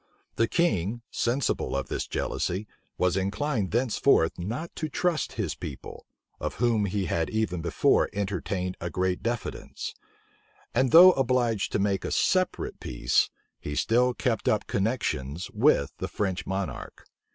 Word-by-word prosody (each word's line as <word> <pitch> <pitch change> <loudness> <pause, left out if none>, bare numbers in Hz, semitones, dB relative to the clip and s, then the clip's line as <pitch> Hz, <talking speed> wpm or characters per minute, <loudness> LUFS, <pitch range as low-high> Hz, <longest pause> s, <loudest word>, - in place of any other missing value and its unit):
The 115 - +2
king, 120 - 0
sensible 120 - 0
of 70 - -2
this - - -3
jealousy, 95 +4 -2 0.3
was 90 0 +2
inclined 100 +3 -1
thenceforth 120 -7 +2
not 120 - -4
to 155 - -2
trust 175 +1 0
his - - -2
people, 70 -3 -8 0.3
of - - -3
whom 115 -3 +2
he 100 0 -1
had 80 -1 -1
even 110 -6 -1
before 80 -2 +2
entertained 95 -2 -2
a 85 - -2
great 90 +1 -1
diffidence; 120 -1 -4 0.8
and 130 +2 +3
though 180 +7 +10
obliged 125 - +1
to - - +3
make 100 -1 0
a - - -2
separate 185 -1 0
peace, - - +1 0.3
he 75 - -5
still 125 +6 +2
kept 115 -4 -1
up 110 - +1
connections 90 - -2
with 105 - +3
the - - -2
French 95 -3 -2
monarch. 95 0 -4
105 Hz, 140 wpm, -27 LUFS, 90-125 Hz, 0.8 s, though